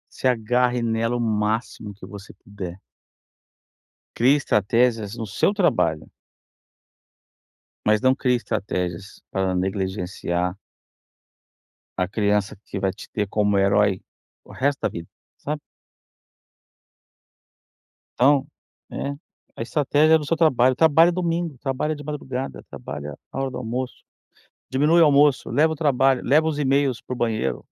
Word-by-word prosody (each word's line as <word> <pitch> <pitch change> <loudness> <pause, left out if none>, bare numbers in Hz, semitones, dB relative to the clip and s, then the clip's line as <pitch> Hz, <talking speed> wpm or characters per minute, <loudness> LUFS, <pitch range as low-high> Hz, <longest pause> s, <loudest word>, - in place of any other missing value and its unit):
se - - -4
agarre 125 +1 +2
nela 115 +1 0
o - - -2
máximo 110 -1 -2
que 100 - -13
você 100 -1 -11
puder 95 -3 -9 1.4
crie 130 +5 +4
estratégias 115 -3 +1
no 115 -2 -4
seu 105 - +1
trabalho 85 - +1 1.8
mas 105 0 +4
não 130 +2 +4
crie 125 -2 +1
estratégias 95 -4 -4
para 95 -1 -1
negligenciar 90 -1 -2 1.4
a 90 -1 0
criança 105 -1 0
que 100 - -5
vai 95 -1 0
te 95 - -12
ter 105 -1 -1
como 105 -1 +1
herói 100 0 +3 0.4
o - - -14
resto 140 +1 0
da - - +2
vida, 85 0 -8 0.3
sabe? 150 +1 -4 2.6
Então, 140 +2 +4 0.4
né, 140 0 -4 0.4
a - - -4
estratégia 150 +5 +3
é - - +6
no 150 - -6
seu 165 - 0
trabalho, 130 -6 +4
trabalha 160 +2 +5
domingo, 170 -4 -2
trabalha 135 +4 -2
de 145 -1 -10
madrugada, 135 -3 -5
trabalha 75 0 -7 0.2
a - - -5
hora 135 0 -1
do 125 - -6
almoço, 125 +2 -5 0.7
diminui 150 +6 +3
o - - +8
almoço, 145 -1 +4
leva 160 +2 +3
o - - -6
trabalho, 135 -4 +2
leva 155 +5 +3
os 150 -2 -2
e-mails 135 -3 +1
para - - -6
o - - -6
banheiro, 110 - -1
120 Hz, 135 wpm, -23 LUFS, 100-140 Hz, 2.6 s, o